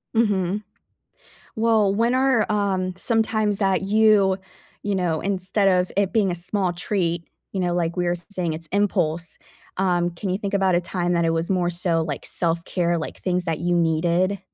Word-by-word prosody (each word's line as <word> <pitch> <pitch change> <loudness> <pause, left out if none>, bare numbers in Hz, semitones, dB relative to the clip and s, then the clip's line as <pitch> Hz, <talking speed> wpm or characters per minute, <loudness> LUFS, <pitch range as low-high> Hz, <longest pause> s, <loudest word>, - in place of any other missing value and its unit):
Mhm. 205 -3 +1 0.9
Well, 220 -3 +3
when 230 +4 +2
are, 260 -4 +2
um, 190 -3 0
some 225 +3 +3
times 215 -2 0
that 195 -2 +1
you, 205 -1 +4 0.5
you 205 -1 -1
know, 170 -4 0
instead 195 +1 0
of 180 -1 +2
it 200 0 +1
being 210 -5 +2
a - - -1
small 180 +1 -1
treat 175 -2 -2 0.2
you 195 - -2
know, 175 -1 0
like 170 -1 -1
we 180 - 0
were - - +2
s-saying 175 0 -3
it's 160 +1 -6
impulse. 175 -5 0 0.4
Um, 175 -2 +1
can 175 +3 -6
you 185 +1 0
think 200 -1 -3
about 190 -2 +2
a 175 - +3
time 175 0 -2
that 170 -1 +2
it 165 - +2
was 165 +2 -1
more 180 -2 +1
so, 170 -1 0
like, 150 -4 -5
self-care, 170 0 -1
like, 160 - -5
things 180 -1 -1
that 165 -3 -2
you 175 +1 +1
needed? 170 +4 +1
185 Hz, 185 wpm, -23 LUFS, 175-200 Hz, 0.9 s, you